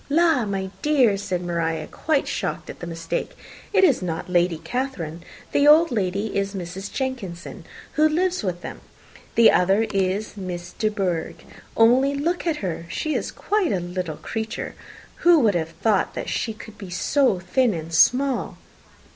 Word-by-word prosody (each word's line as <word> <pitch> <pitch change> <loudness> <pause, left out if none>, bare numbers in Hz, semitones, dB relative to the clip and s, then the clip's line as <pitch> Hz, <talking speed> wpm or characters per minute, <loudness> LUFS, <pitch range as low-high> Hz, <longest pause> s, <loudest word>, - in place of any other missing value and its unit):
"La! 320 -5 +3
my 195 -2 -3
dear," 265 -9 +4
said 185 -3 -3
Maria, 165 -2 -1
quite 305 - -1
shocked - - -3
at - - -14
the 175 - -6
mistake, 165 0 -4 0.3
"it - - +4
is 285 - +4
not 165 -3 -3
Lady 175 -2 +2
Catherine. 170 - -4 0.3
The 285 - +3
old 320 +2 +7
lady 200 -1 -1
is 200 0 -1
Mrs. 190 +2 -6
Jenkinson, 240 -11 -5 0.3
who 310 +1 +3
lives 360 +3 0
with 175 -3 -2
them. - - -8 0.5
The 230 - +7
other 195 +4 +3
is 195 +2 -1
Miss 180 -3 -6
De 215 - 0
Bourgh. 185 -6 -2 0.3
Only 255 +5 +5
look 340 +5 -1
at 320 -2 +1
her. 170 -1 -4
She 310 - -2
is - - -2
quite 410 -5 0
a 190 - +1
little 175 -3 -4
creature. 225 0 -4 0.4
Who 345 -1 +6
would 215 -4 +4
have 165 -2 -1
thought 190 +5 0
she 225 - -2
could 215 -1 -12
be 195 - -8
so 230 +5 +2
thin 210 +5 +1
and 165 0 -6
small!" 260 +9 +3
200 Hz, 165 wpm, -23 LUFS, 175-265 Hz, 0.5 s, old